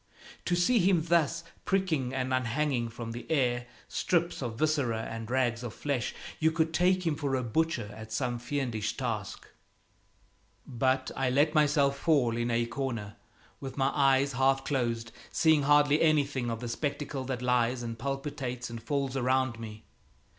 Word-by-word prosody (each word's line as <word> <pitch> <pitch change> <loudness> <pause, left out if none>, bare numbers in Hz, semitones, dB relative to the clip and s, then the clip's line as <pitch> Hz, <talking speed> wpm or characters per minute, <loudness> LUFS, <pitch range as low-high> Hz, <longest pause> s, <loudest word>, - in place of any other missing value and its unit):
To 175 - +1
see 175 +8 +3
him 180 -3 +3
thus 170 -2 +2 0.2
pricking 165 -10 0
and 130 0 -1
unhanging 130 0 0
from 115 0 -6
the 120 +1 -7
air 125 -5 +1 0.2
strips 170 -3 0
of 115 -3 -4
viscera 135 -7 +1
and 115 0 -6
rags 120 -2 +1
of 120 -2 -6
flesh, 140 -4 -2 0.2
you 160 - +4
could 160 0 0
take 180 +2 +2
him 160 -3 +1
for 140 -2 -1
a 130 - -1
butcher 155 0 0
at 110 0 -10
some 120 +1 -1
fiendish 120 -5 -2
task. 115 -6 -4 1.2
But 130 +1 0
I 135 -1 +1
let 145 +4 +3
myself 145 -2 +3
fall 135 -8 +2
in 120 0 -1
a 120 0 +1
corner 115 -5 -4 0.4
with 135 -1 -7
my 135 0 +2
eyes 135 0 +3
half 135 +1 +2
closed, 115 -4 -1 0.2
seeing 160 -2 +4
hardly 145 +1 +4
anything 145 -6 +2
of 115 0 -4
the 120 - -4
spectacle 140 +2 -3
that 125 -1 -3
lies 125 0 +1
and 115 -1 -5
palpitates 135 -2 -4
and 115 -1 -6
falls 135 +2 -2
around 130 -2 +1
me. 110 -1 -8
130 Hz, 160 wpm, -29 LUFS, 120-145 Hz, 1.2 s, you